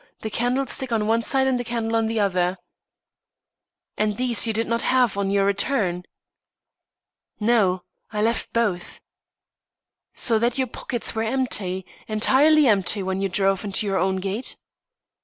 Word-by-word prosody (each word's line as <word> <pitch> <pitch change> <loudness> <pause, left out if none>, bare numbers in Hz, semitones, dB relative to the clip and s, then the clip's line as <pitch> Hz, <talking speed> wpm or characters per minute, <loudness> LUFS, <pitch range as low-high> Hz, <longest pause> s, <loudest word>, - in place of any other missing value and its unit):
The 220 - -5
candlestick 250 +2 -1
on 220 -2 0
one 225 +2 +2
side 265 +3 +1
and 260 -2 +1
the - - -2
candle 230 -1 -2
on 225 -1 +1
the 225 0 -1
other." 185 -2 0 1.4
"And 210 -1 0
these 245 -2 +3
you - - +1
did 225 +1 -1
not 230 0 0
have 250 -5 +2
on 200 -1 -1
your 200 0 +2
return?" 195 -4 0 1.3
"No, 210 -5 +2 0.3
I 210 -1 -2
left 230 +1 -1
both." 210 -7 -2 1.2
"So 225 -3 +3
that 235 +2 0
your 260 - +1
pockets 240 0 -2
were 220 - -2
empty 220 -6 -2 0.2
entirely 280 +8 +4
empty 200 -3 +2
when 190 +1 -2
you 195 - 0
drove 195 0 +1
into 205 +1 -1
your 195 -1 0
own 190 0 +1
gate?" 195 +6 -3
220 Hz, 155 wpm, -23 LUFS, 195-240 Hz, 1.4 s, entirely